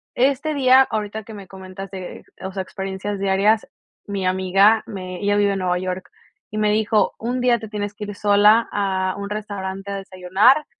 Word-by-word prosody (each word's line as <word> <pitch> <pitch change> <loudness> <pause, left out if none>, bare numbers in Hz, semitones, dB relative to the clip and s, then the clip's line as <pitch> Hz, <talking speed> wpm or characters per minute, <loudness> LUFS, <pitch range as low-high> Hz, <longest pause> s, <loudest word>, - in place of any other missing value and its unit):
este 280 +4 +1
día, 260 -2 +6
ahorita 215 0 -3
que 220 - -11
me 200 -3 -10
comentaste, 190 0 -9 0.2
o 190 - -4
sea, 190 -1 -3
experiencias 190 +2 -5
diarias, 200 +3 +2 0.4
mi 200 -2 -3
amiga 195 +4 +3
me 185 -4 -6
ella 205 0 +2
vive 205 -1 +3
en 195 - -2
Nueva 180 -1 0
York 185 0 -4 0.4
y 215 - -5
me 210 0 +2
dijo: 215 0 +2
"Un 245 +3 -2
día 245 -1 +3
te 220 - -8
tienes 205 -1 -4
que 210 0 -7
ir 205 0 -7
sola 210 +2 +4
a 190 -2 -1
un 200 0 -5
restaurante 200 -2 -5
a 200 - -3
desayunar" 195 +9 +2
205 Hz, 185 wpm, -21 LUFS, 190-215 Hz, 0.4 s, día